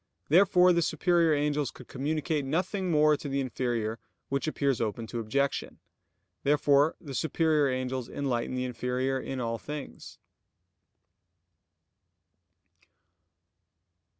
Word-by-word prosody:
Therefore 180 +2 +6
the 170 - +2
superior 170 -1 +2
angels 145 -2 0
could 130 - -13
communicate 150 +2 -2
nothing 180 +6 -1
more 150 -1 +4
to 145 - -6
the 140 0 -1
inferior; 120 -4 -2 0.3
which 140 +3 -1
appears 140 -5 0
open 115 +1 -2
to 120 +1 -5
objection. 140 +5 -1 0.6
Therefore 145 +1 +3
the 145 -6 -9
superior 155 +2 +2
angels 130 -1 -3
enlighten 130 -3 -2
the 125 0 -1
inferior 125 +2 -1
in 130 0 -5
all 115 -1 -2
things. 145 - -8
140 Hz, 110 wpm, -29 LUFS, 125-155 Hz, 0.6 s, Therefore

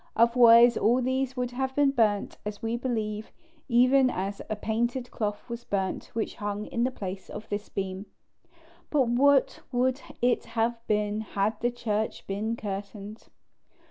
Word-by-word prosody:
Otherwise 235 0 +7
all 240 +4 +3
these 260 +1 -1
would 250 -1 -1
have 265 +1 -3
been 285 -1 +4
burnt, 215 -6 +1
as 210 +2 -6
we 225 +1 -1
believe, 220 -4 -3 0.4
even 255 +2 +5
as 200 -2 -3
a 215 - -1
painted 240 +4 -2
cloth 210 0 -3
was 235 0 -6
burnt 195 -3 -2
which 225 - -2
hung 205 -1 -3
in 235 - -2
the 255 - +2
place 195 -6 -7
of 215 +1 -8
this 205 +1 -4
beam. 190 +1 -4 0.8
But 275 -5 +2
what 275 +3 +3
would 255 +2 +1 0.2
it 245 0 +1
have 230 +1 +1
been 210 0 0
had 210 0 -1
the 240 - +2
church 220 -3 -3
been 215 +4 -2
curtained? 205 0 -7
230 Hz, 155 wpm, -27 LUFS, 210-245 Hz, 0.8 s, Otherwise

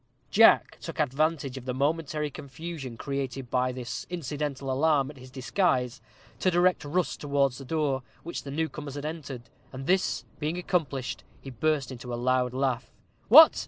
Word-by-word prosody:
Jack 225 +2 +6
took 165 - -7
advantage 145 -1 0
of 125 - -14
the 125 -1 -2
momentary 150 +1 0
confusion 140 -4 -7
created 135 -2 -4
by 125 0 +2
this 125 -1 -5
incidental 145 -4 -3
alarm 140 0 +2
at 145 - -16
his 130 0 -12
disguise 130 -1 0 0.4
to 185 - +3
direct 180 0 +3
Rust 165 +5 -1
towards 140 -3 +1
the 135 - -8
door 145 -2 0
by 130 - -22 0.2
which 170 - -4
the 140 - -8
new 160 +3 0
comers 145 -3 -7
had 145 0 -5
entered; 150 -6 -5 0.3
and, 135 0 -7
this 185 +4 +1
being 155 +3 -1
accomplished, 155 -8 -1 0.2
he 135 - -9
burst 145 +2 0
into 125 -1 -7
a - - -1
loud 125 0 +2
laugh. 130 -3 -1 0.4
"What! - - +10
140 Hz, 170 wpm, -28 LUFS, 130-155 Hz, 0.4 s, What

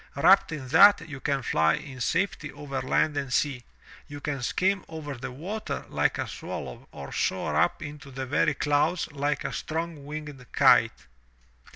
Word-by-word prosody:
Wrapped 185 +8 +5
in 145 -4 -5
that, 165 +3 +7
you 140 -3 -7
can 140 -1 -1
fly 80 -6 +3
in 130 -2 -9
safety 165 0 -1
over 140 -1 -5
land 145 +3 +1
and 135 -2 -3
sea; 130 -2 0 0.4
you 145 -1 -8
can 140 -2 -3
skim 190 +9 +1
over 155 -3 -6
the 125 -1 -6
water 185 +12 -5
like - - +1
a - - -2
swallow - - -7
or - - -9
soar - - -1
up - - +2
into 145 -1 -9
the 130 0 -5
very 135 +3 +1
clouds 150 +4 +1
like 145 +1 -1
a - - -3
strong 165 -2 -4
winged 150 -3 -7
kite." - - +4
145 Hz, 170 wpm, -27 LUFS, 135-160 Hz, 0.4 s, that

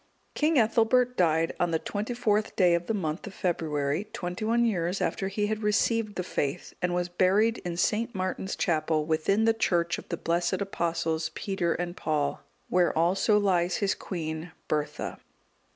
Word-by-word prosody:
King 305 +1 +2
Ethelbert 240 +2 +3
died 165 -3 +2
on 175 - +2
the 165 - +1
24th 215 +3 -1
day 180 -3 +4
of 170 0 0
the 225 - 0
month 160 -3 -3
of 195 - -9
February, 155 -1 -1
twenty 180 -2 -4
one 235 +2 +2
years 180 -4 0
after 190 - -1
he 205 +2 -1
had 215 +1 -2
received 210 0 +1
the 180 - -2
faith,(192) 145 0 -3
and 180 0 0
was 175 0 0
buried 195 +6 +2
in 175 -1 -5
St. 225 +5 0
Martin's 185 0 -2
chapel 155 -2 +1
within 160 +7 +2
the 225 - +4
church 175 -5 +1
of - - -14
the 170 - -2
blessed 170 +3 0
Apostles 170 -4 -1
Peter 180 -4 -1
and 175 0 -3
Paul, 145 -4 -1 0.3
where 180 -2 +2
also 185 +6 +3
lies 180 -4 +2
his 200 -1 +1
queen, 160 -2 -5 0.2
Bertha. 150 -1 -2
180 Hz, 170 wpm, -28 LUFS, 165-210 Hz, 0.3 s, day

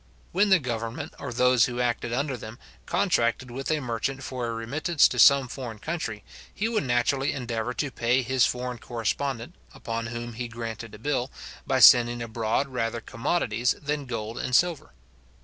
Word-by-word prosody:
When 200 +3 +3
the 190 - +7
government, 125 +2 -4
or 140 - -5
those 125 -1 +4
who 125 -1 -4
acted 120 -1 -1
under 135 +2 -1
them, 110 0 -9 0.3
contracted 120 +2 +1
with 135 +3 -5
a 155 -1 +1
merchant 130 +2 -3
for 125 -2 -4
a - - -2
remittance 140 +8 +2
to - - -4
some 140 -2 +7
foreign 125 -3 -7
country, 110 -6 -4 0.3
he 215 - -2
would 225 -9 0
naturally 125 +3 +1
endeavour 120 -1 -3
to 145 -3 -2
pay 125 +2 +1
his 130 +1 +2
foreign 125 -1 -1
correspondent, 120 +2 -3 0.2
upon 115 0 -4
whom 120 0 -5
he 120 +2 -4
granted 115 -2 -7
a - - -10
bill, 125 +2 -1 0.4
by 130 -1 +2
sending 120 -1 +8
abroad 115 +4 -1
rather 120 -2 -2
commodities 120 -1 0
than 145 -1 -3
gold 115 0 -4
and 125 - 0
silver. 170 - +2
125 Hz, 170 wpm, -26 LUFS, 115-135 Hz, 0.4 s, sending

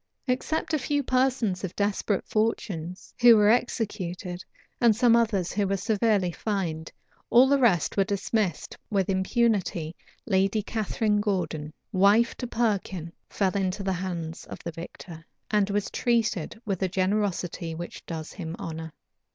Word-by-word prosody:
Except 275 +5 -1
a 310 - +2
few 285 +2 0
persons 255 -8 +1
of 185 -1 -4
desperate 205 0 0
fortunes, 190 -5 -2
who 240 -2 +9
were 210 0 +5
executed, 190 -7 -2 0.4
and 235 -3 +5
some 235 0 +5
others 210 -6 +1
who 200 0 0
were 195 +1 0
severely 205 -2 +1
fined, 170 -5 -3 0.4
all 250 +3 +7
the 280 +1 +3
rest 200 - +3
were 195 - +5
dismissed 200 -2 -1
with 195 -2 +1
impunity 190 -5 0 0.3
Lady 195 +1 +2
Catharine 215 -1 0
Gordon, 180 -7 -2 0.2
wife 205 +5 +4
to 245 - -4
Perkin 195 -8 -1 0.2
fell 195 -1 0
into 195 0 -1
the 190 -1 0
hands 170 -3 -4
of - - -8
the 170 - -4
victor, 165 0 -9 0.3
and 210 -2 +2
was 205 0 -1
treated 225 -5 0
with 195 -4 -2
a 190 - +2
generosity 185 -3 -1
which 170 +1 -7
does 160 -2 -6
him 165 -3 -6
honor. 160 0 -6
200 Hz, 145 wpm, -27 LUFS, 180-225 Hz, 0.4 s, who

